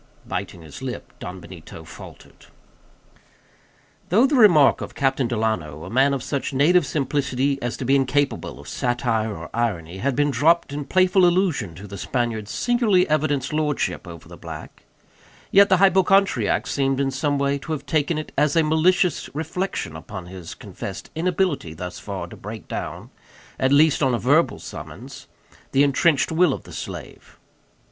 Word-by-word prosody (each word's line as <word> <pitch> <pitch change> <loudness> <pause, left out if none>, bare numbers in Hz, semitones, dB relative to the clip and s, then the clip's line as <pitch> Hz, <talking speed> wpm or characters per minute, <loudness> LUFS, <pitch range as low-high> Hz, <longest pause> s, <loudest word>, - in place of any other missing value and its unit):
Biting 85 - -5
his 75 -3 -11
lip, - - -6
Don 90 +1 -7
Benito 85 -1 -11
faltered. - - -14 1.6
Though 220 +9 +5
the 280 - 0
remark 185 - +6
of - - -7
Captain 135 -2 +1
Delano, 110 - -2
a 90 - -8
man 135 +3 +3
of 130 - -5
such 140 0 -3
native 155 +4 +4
simplicity 140 -1 -1
as 120 0 -3
to 130 - -5
be 135 +3 +3
incapable 140 +1 0
of - - -12
satire 115 -4 -1
or 80 - -9
irony, 95 -7 -2
had 135 +4 0
been 145 0 +2
dropped 155 +4 +2
in 145 0 -4
playful 185 +3 +3
allusion 175 - +2
to 95 +5 -10
the 100 -1 -8
Spaniard's 115 -3 -2
singularly 225 -7 +2
evidenced 145 -2 0
lordship 150 -9 -1
over 85 -2 -10
the - - -11
black; - - -10 0.7
yet 200 +1 +6
the 190 - +5
hypochondriac 195 +1 +3
seemed 135 -1 0
some 145 +1 0
way 140 0 0
to 160 - -8
have 145 -2 -3
taken 155 +1 0
it 155 - -5
as 150 0 +2
a 165 - +4
malicious 165 +2 +2
reflection 160 - -3
upon 90 +3 -8
his 90 -2 -9
confessed - - -8
inability 170 - -1
thus 90 +2 -7
far - - -5
to - - -11
break - - -9
down, - - -6 0.5
at 130 0 +2
least, 150 +1 +4
on 130 -3 +2
a - - 0
verbal 145 +8 +2
summons, - - -10 0.5
the 135 - +5
entrenched 145 +2 +2
will 165 -2 +3
of - - -7
the - - -13
slave. - - -8
140 Hz, 165 wpm, -23 LUFS, 115-160 Hz, 1.6 s, remark